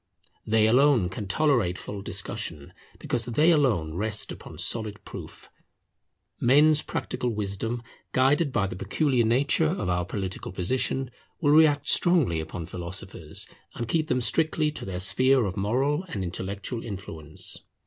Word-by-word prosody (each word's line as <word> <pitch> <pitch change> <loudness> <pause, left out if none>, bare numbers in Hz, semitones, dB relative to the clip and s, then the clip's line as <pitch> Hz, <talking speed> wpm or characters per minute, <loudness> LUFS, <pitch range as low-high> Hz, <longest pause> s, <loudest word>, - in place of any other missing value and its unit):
They 110 0 +4
alone 125 -4 +4
can 100 +2 -6
tolerate 115 - +2
full 100 -1 -7
discussion, 75 -6 -5 0.2
because 120 -2 -2
they 150 +8 +3
alone 115 - +2
rest 105 +4 -1
upon - - -10
solid 110 -3 +1
proof. - - -9 0.9
Men's 150 +4 +5
practical 125 - -3
wisdom, 110 +2 -3 0.3
guided 140 +4 +3
by 110 -6 +1
the 95 - -5
peculiar 120 - +1
nature 135 +7 +3
of 155 - -2
our 90 0 +1
political 95 0 -5
position, 125 +7 -1 0.3
will 145 -4 +3
react 150 -1 +5
strongly 165 - +4
upon 80 +2 -5
philosophers, 90 -1 -5 0.3
and 120 - -4
keep 155 +3 0
them 125 -5 +1
strictly 155 +3 +1
to - - -7
their 95 -2 -4
sphere 130 +5 +3
of 95 -2 -3
moral 135 - 0
and 105 - -4
intellectual 100 +6 -4
influence. 80 -7 -5
115 Hz, 140 wpm, -26 LUFS, 95-145 Hz, 0.9 s, Men's